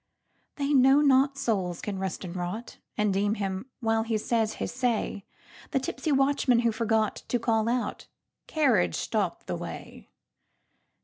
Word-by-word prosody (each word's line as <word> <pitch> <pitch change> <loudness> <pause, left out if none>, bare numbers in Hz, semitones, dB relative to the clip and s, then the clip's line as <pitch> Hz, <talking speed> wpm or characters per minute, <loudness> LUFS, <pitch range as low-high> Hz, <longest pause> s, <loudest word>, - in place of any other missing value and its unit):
They 285 0 0
know 270 +2 +6
not 275 -1 +4
souls 195 -10 -1
can 200 -2 -4
rust 190 -1 -3
and 175 0 -7
rot, 185 +7 -5 0.2
And 210 -2 +2
deem 205 +2 +1
him, 195 +2 -3
while 225 -1 +2
he 225 0 -1
says 220 0 0
his - - -4
say, 240 -5 -1 0.4
The 270 - +1
tipsy 285 +4 -3
watchman 270 -3 +3
who 235 -1 +2
forgotTo 225 +1 0
call 225 -1 +1
out, 245 0 -2 0.4
"Carriage 260 - +2
stops - - -2
the - - -3
way!" - - -8
230 Hz, 145 wpm, -27 LUFS, 205-260 Hz, 0.4 s, know